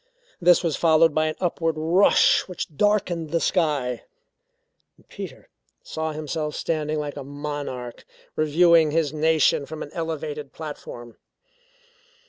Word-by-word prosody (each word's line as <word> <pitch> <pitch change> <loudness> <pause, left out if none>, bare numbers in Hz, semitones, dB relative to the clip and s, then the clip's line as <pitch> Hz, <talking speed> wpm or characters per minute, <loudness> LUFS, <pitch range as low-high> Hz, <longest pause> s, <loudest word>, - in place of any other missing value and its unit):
This 175 +1 +5
was 165 -4 0
followed 165 -1 +4
by 155 +1 +1
an 155 - -3
upward 165 -2 -1
rush 170 +6 +4
which 175 -4 -6
darkened 185 -5 +1
the 165 +2 0
sky. 150 -10 0 1.1
Peter - - -9 0.4
saw 160 0 -4
himself 150 0 -4
standing 155 -1 -2
like 145 -1 -4
a 140 - -5
monarch 145 -4 -6 0.3
reviewing 160 +1 +4
his 155 -1 0
nation 155 -2 +2
from 155 0 -6
an 145 - -10
elevated 155 -3 -5
platform. 120 -6 -9
155 Hz, 120 wpm, -24 LUFS, 145-165 Hz, 1.1 s, This